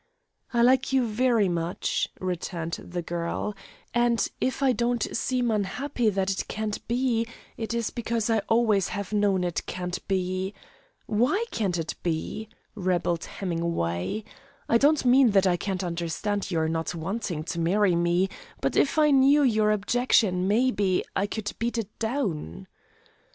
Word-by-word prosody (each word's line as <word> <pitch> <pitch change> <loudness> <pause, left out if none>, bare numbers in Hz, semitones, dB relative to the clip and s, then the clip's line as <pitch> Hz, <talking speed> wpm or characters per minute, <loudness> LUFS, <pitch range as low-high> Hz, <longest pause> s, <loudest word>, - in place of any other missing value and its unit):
"I 235 -1 +3
like 260 +2 +4
you 265 -2 +3
very 230 -1 +2
much," 170 0 -1
returned 175 -2 -3
the 175 0 -5
girl, 170 +5 -3 0.4
"and, 240 -1 +2
if 260 +2 0
I 265 - +5
don't 240 -1 0
seem 245 0 0
unhappy 220 +4 0
that 195 -1 0
it 190 - -3
can't 215 -1 -4
be, 235 -1 +1 0.3
it 230 +1 -3
is 235 -2 -1
because 230 -2 -1
I 225 -1 +3
always 220 -5 +3
have 200 +1 -5
known 200 -3 +2
it 175 -2 -2
can't 180 0 -3
be 185 +1 -1 0.3
" - - -33 0.2
"Why 255 - +1
can't 195 -6 -1
it 165 -1 -3
be?" 175 +6 -3 0.2
rebelled 180 -4 0
Hemingway. 170 - -2 0.4
"I 230 - +4
don't 290 +1 +3
mean 255 0 +6
that 195 - +5
I 180 -2 +3
can't 190 +1 -3
understand 175 +4 -2
your 160 -3 +1
not 165 +2 -2
wanting 170 -1 -3
to 170 +1 -4
marry 185 +2 +3
me, 175 +2 +2 0.3
but - - -1
if 285 - +2
I 300 -1 +5
knew 280 +2 +5
your 215 -5 +3
objection, 210 -3 +2
maybe, 205 -4 +2
I 195 - +1
could 210 0 -4
beat 235 +2 -1
it 215 -2 -5
down." 210 - -2
205 Hz, 155 wpm, -26 LUFS, 180-235 Hz, 0.4 s, mean